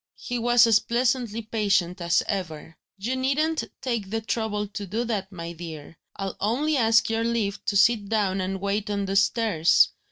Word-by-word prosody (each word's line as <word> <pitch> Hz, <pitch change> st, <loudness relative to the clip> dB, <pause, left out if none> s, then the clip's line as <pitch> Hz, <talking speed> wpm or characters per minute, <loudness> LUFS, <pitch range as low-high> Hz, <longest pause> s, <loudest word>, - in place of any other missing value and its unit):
He 245 Hz, -1 st, -4 dB
was 240 Hz, 0 st, +5 dB
as 225 Hz, -2 st, +5 dB
pleasantly 235 Hz, -2 st, -1 dB
patient 200 Hz, -5 st, 0 dB
as 170 Hz, 0 st, +2 dB
ever: 165 Hz, -5 st, -4 dB, 0.2 s
"You 230 Hz, +7 st, -2 dB
needn't 295 Hz, +5 st, 0 dB, 0.2 s
take 235 Hz, -7 st, -2 dB
the 225 Hz, +2 st, -1 dB
trouble 220 Hz, -2 st, -2 dB
to 200 Hz, 0 st, -7 dB
do 220 Hz, +6 st, -2 dB
that, 210 Hz, -5 st, -3 dB
my 170 Hz, -2 st, -6 dB
dear; 160 Hz, -2 st, -9 dB, 0.2 s
I'll 195 Hz, -1 st, -4 dB
only 275 Hz, +9 st, 0 dB
ask 225 Hz, -3 st, +4 dB
your 225 Hz, 0 st, 0 dB
leave 230 Hz, -4 st, -1 dB
to 200 Hz, -, +1 dB
sit 210 Hz, -1 st, +3 dB
down 200 Hz, -4 st, 0 dB
and 190 Hz, +1 st, -3 dB
wait 200 Hz, +2 st, -2 dB
on 200 Hz, -1 st, -1 dB
the 195 Hz, 0 st, -3 dB
stairs. 200 Hz, -5 st, +3 dB
210 Hz, 180 wpm, -25 LUFS, 195-235 Hz, 0.2 s, was